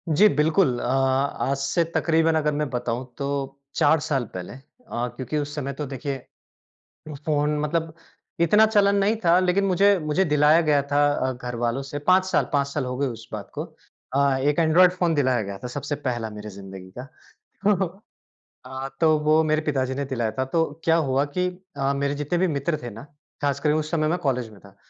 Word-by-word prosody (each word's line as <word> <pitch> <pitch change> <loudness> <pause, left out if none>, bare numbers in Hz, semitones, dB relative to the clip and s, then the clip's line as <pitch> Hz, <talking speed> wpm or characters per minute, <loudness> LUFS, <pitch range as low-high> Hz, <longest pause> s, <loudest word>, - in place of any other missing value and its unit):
जी, 160 +7 +6
बिल्कुल 150 -4 +2
अ, - - -5
आज 135 +1 +1
से 140 +5 +1
तकरीबन 165 -1 +2
अगर 150 -1 +1
मैं 150 -1 -1
बताऊँ 125 0 -3
तो 140 - -3 0.5
4 160 - +4
साल 135 -4 0
पहले 90 -1 -6
अ, - - -10 0.6
क्योंकि 130 +3 -3
उस 145 0 -3
समय 140 -2 -3
तो 150 +2 -5
देखिए 135 +1 -4 1.1
फ़ोन 150 -1 +1
मतलब 160 +2 -1 0.5
इतना 210 +6 +5
चलन 205 -2 +3
नहीं 200 +2 +2
था 170 +1 +6
लेकिन 185 +2 +2
मुझे 195 +2 +4
मुझे 155 +4 +1
दिलाया 150 +1 +4
गया 150 -3 +3
था 145 0 +4
अ, 130 -2 -1
घरवालों 120 0 -3
से 140 +1 -6
5 185 +5 +3
साल, 190 - +1
5 140 -1 +2
साल 140 -1 -3
हो 125 0 -4
गए 140 +1 0
उस 115 -2 -8
बात - - -6
को - - -3 0.5
अ, 140 -1 +3
एक 145 +4 +1
एंड्रॉयड 170 +3 +5
फ़ोन 180 -2 0
दिलाया 130 -4 +2
गया 100 -1 -6
था - - -3
सबसे 145 +3 -4
पहला 120 -3 -2
मेरे 105 0 -8
ज़िंदगी 95 -2 -10
का 125 - -6 0.6
तो 195 -2 +3 0.8
अ, 130 +1 -5
तो 160 -2 +5
वो 155 +1 +4
मेरे 155 0 +1
पिताजी 130 -2 -1
ने 140 +1 -2
दिलाया 120 -5 -2
था 130 - +2
तो 165 -1 +4 0.2
क्या 165 0 +4
हुआ 135 +2 +2
कि 180 0 +2 0.3
अ, 135 0 0
मेरे 140 +1 -1
जितने 145 +4 -2
भी 185 - +3
मित्र 140 +3 -1
थे 120 - -5
ना 110 +1 -10 0.4
ख़ासकर 145 +1 +1
उस 155 0 -1
समय 155 -2 +1
मैं 175 +3 0
कॉलेज 125 -7 -1
में 105 - -15
था। 100 -1 -18
145 Hz, 200 wpm, -24 LUFS, 130-160 Hz, 1.1 s, जी